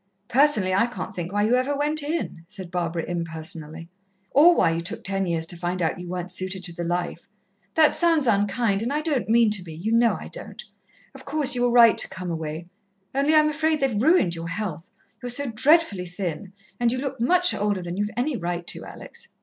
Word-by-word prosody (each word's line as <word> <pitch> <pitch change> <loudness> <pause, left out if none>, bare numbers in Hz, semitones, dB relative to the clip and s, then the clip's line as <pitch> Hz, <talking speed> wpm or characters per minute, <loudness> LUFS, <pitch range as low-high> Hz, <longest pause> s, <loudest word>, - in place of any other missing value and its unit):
"Personally, 245 -9 +4
I 200 +5 +3
can't 215 -7 -7
think 175 0 -5
why 205 +1 +1
you 220 +3 +2
ever 260 +3 +1
went 300 +2 +2
in," 290 - -4
said 190 -3 -10
Barbara 170 -2 -2
impersonally. 165 -1 -4 0.4
"Or 335 +5 +6
why 165 - +3
you 165 0 -2
took 170 - -5
ten 195 -1 -1
years 165 -1 -1
to 175 - -2
find 175 +1 -3
out 165 0 -1
you 180 - -8
weren't 180 0 -4
suited 185 +1 -3
to 175 -1 -4
the 170 - -5
life. 175 +1 -3 0.5
That 310 -1 +5
sounds 330 -4 +3
unkind, 205 -1 +1
and 235 +4 -2
I 300 +1 0
don't 295 -8 -1
mean 230 -1 +4
to 200 -3 +2
be 160 -3 -9
you 195 +8 -3
know 230 0 +3
I - - -9
don't. - - -10 0.5
Of - - -13
course, 290 -1 0
you 245 - +2
were 245 - +3
right 235 -2 +6
to - - +4
come 180 -1 -6
away. 160 0 -5 0.5
Only 280 +3 +2
I'm 305 0 +5
afraid 310 +1 0
they've 255 -7 0
ruined 290 - +3
your 165 0 -6
health 170 -2 -5 0.3
you're 245 - -5
so 255 +1 0
dreadfully 225 - +3
thin, 180 +1 -5 0.3
and 240 -1 +2
you 255 - -1
look 265 -1 -4
much 360 +8 +3
older 205 -3 -1
than 175 0 -5
you've 205 +2 -1
any 265 +3 0
right 175 -3 -4
to, - - -4
Alex. - - -8
205 Hz, 215 wpm, -24 LUFS, 175-270 Hz, 0.5 s, Or